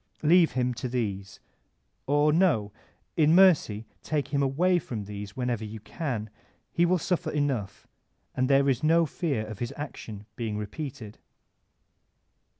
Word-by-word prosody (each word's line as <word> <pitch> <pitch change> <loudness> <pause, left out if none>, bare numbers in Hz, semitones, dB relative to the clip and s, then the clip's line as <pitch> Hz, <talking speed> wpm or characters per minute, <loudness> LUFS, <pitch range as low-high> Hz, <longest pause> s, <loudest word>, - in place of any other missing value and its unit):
Leave 165 +2 +5
him 125 -1 0
to 120 +2 -4
these; 100 -6 -3 0.7
or 145 +2 +3
no, 155 - +2 0.4
in 155 0 +4
mercy 155 - +4 0.2
take 150 -2 -2
him 140 -1 0
away 175 +7 +2
from 115 -9 -5
these 100 +1 -8
when 125 -1 -1
ever 120 -3 -1
you 110 +1 -7
can; 110 0 -4 0.4
he 175 +1 +2
will 180 +1 +3
suffer 175 0 -1
enough, 140 -10 -2 0.5
and 130 +1 0
there 140 0 +4
is 130 -2 +1
no 165 +2 +4
fear 140 -7 -2
of 110 -2 -8
his 120 - -3
action 110 -8 -7
being 110 -3 -3
repeated. 110 +1 -6
130 Hz, 150 wpm, -27 LUFS, 110-155 Hz, 0.7 s, Leave